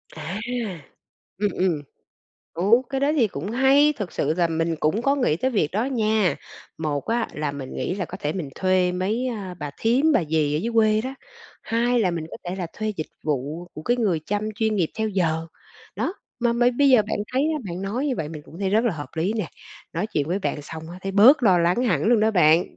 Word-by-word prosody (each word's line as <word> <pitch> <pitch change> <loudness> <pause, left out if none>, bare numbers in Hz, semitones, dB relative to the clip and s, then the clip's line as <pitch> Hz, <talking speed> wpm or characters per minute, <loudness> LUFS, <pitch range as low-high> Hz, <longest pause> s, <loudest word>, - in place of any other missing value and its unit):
À! 165 +6 -5 1.0
Ừm, 205 0 +1
ừm. 175 -5 0 0.7
Ừ, 170 - -3 0.3
cái 270 - -1
đó 285 +2 +2
thì 245 -6 +4
cũng 175 +4 -5
hay! 270 +5 +5
Thực 200 -5 -5
sự 150 +2 0
là 175 -2 +2
mình 165 0 -1
cũng 195 +10 +1
có 275 +2 +3
nghĩ 250 - +2
tới 260 +8 0
việc 200 - +1
đó 215 +5 +1
nha. 220 -7 +1 0.4
Một 150 -3 -2
á 230 0 0
là 150 -1 -2
mình 135 -2 -7
nghĩ 130 +7 -2
là 190 -2 -2
có - - -8
thể 150 - -1
mình 165 -5 -4
thuê 185 -1 +2
mấy, 205 +8 -1
à, 200 -6 -5
bà 145 -1 -4
thím, 265 +8 +3
bà 175 - +3
dì 150 -1 +1
ở - - +1
dưới 230 +7 -2
quê 215 -1 +4
đó. 260 +4 -5 0.5
Hai 235 +2 +1
là 190 -5 +2
mình 165 -2 -4
có - - -7
thể 180 +2 -4
là 180 - -3
thuê 215 - -3
dịch 155 - -3 0.2
vụ 150 +3 -2
của 155 - -7
cái 240 +8 +1
người 195 -9 +1
chăm 210 +1 -1
chuyên 220 0 0
nghiệp 170 -5 +1
theo 220 0 +1
giờ. 165 -5 0 0.5
Đó, 375 - -1 0.2
mà 235 -1 +2
mây 240 +1 +3
bây 280 +3 +3
giờ 240 -5 +6
bạn - - -1
thấy 265 +3 +2 0.2
bạn 180 +1 -5
nói 235 +9 -2
như 260 - 0
vậy 155 - -3
mình 155 -1 -8
cũng 165 +4 -13
thấy 195 -2 -1
rất 220 +4 +3
là 230 - +2
hợp 145 -4 -7
lý 170 +6 +1
nè. 215 -7 -2 0.4
Nói 175 +6 -1
chuyện 150 -8 -2
với 180 +3 0
bạn 155 -6 -3
xong 160 +2 -8 0.2
thấy 195 0 -3
bớt 250 +9 +7
lo 190 -6 +5
lắng 175 +7 +2
hẳn 170 - +1
luôn 230 0 +4
đó 220 +1 +3
bạn. 170 -2 +3
195 Hz, 235 wpm, -24 LUFS, 160-230 Hz, 1.0 s, bớt